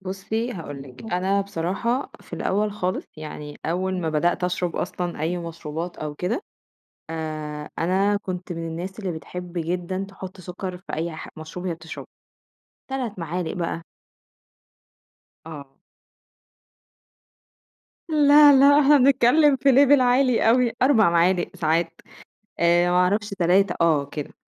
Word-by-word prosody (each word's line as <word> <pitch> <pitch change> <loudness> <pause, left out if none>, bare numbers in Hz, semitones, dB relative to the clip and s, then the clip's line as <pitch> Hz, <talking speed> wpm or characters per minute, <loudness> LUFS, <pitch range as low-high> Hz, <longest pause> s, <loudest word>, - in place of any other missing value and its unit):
بُصّي، 195 +5 -3
هاقول 145 - -7
لِك، 130 -2 -13
أنا 190 +3 +1
بصراحة 200 +7 -2
في - - -20
الأول 210 +2 -1
خالص 185 -2 -3
يعني 150 -1 -8
أول 185 +3 -1
ما 165 - -2
بدأت 175 +4 +1
أشرَب 180 -1 -2
أصلًا 175 -2 -3
أي 170 +3 -1
مشروبات 165 0 -6
أو 150 -1 -5
كده، 200 - -2 0.7
آآ، 155 -2 -5
أنا 195 +4 +2
كنت 180 -2 -6
من 165 0 -5
الناس 180 +5 -6
اللي 190 -4 -3
بتحب 175 +2 -8
جدًا 180 +3 -2
تحُط 190 -1 -10
سُكّر 180 +1 -6
في 185 - -11
أي 165 +2 -2
ح - - -8
مشروب 160 +3 -8
هي 170 - -1
بتشربه. 160 0 -9 0.8
3، 250 -7 -3
معالق 170 +1 -3
بقى. 170 -1 -3 1.6
آه. 145 -4 -9 2.4
لا، 295 -1 +7
لأ، 280 +2 +6
إحنا 295 0 +6
بنتكلّم 275 +2 +5
في 275 +2 +2
level 280 +2 +6
عالي 250 -2 +3
أوي، 245 0 +3
4 230 -9 +5
معالق، 175 +1 +2
ساعات، 165 +1 -1 0.6
آآ، 175 +1 +3
ما 180 - +2
أعرفش 200 +4 +2
3، 190 0 +2
آه 160 -4 +3
كده، 145 0 -7
180 Hz, 135 wpm, -23 LUFS, 165-210 Hz, 2.4 s, لا